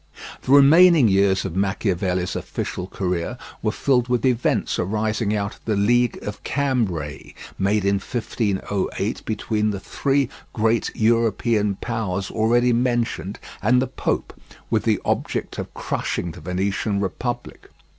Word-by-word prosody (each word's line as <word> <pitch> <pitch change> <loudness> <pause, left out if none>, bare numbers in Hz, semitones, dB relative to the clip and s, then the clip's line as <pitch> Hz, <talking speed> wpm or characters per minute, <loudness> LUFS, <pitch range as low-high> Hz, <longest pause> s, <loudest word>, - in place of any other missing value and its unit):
The - - -3
remaining 150 -1 +7
years 95 -1 +3
of 80 - -4
Machiavelli's 95 -2 0
official 90 - -4
career 90 +4 -2 0.2
were 110 - +1
filled 125 0 +1
with 125 +1 0
events 125 -2 +1
arising 110 +2 0
out 100 0 -2
of - - -20
the 110 - +1
League 120 +4 +2
of 105 - -6
Cambrai, 100 - -2 0.2
made 100 +1 +1
in 100 0 +3
1508 100 -2 -2
between 110 0 -1
the 100 -2 -3
three 140 +5 0 0.3
great 115 +1 +1
European 110 -2 +2
powers 100 -5 -2
already 120 +2 +3
mentioned 120 -6 0 0.2
and 125 +4 +4
the 130 - +1
pope, - - -2 0.4
with - - +1
the - - +2
object - - -2
of - - -5
crushing 85 - -2
the 80 - -12
Venetian 95 +4 -1
Republic. 120 +5 -4
110 Hz, 135 wpm, -22 LUFS, 95-120 Hz, 0.4 s, remaining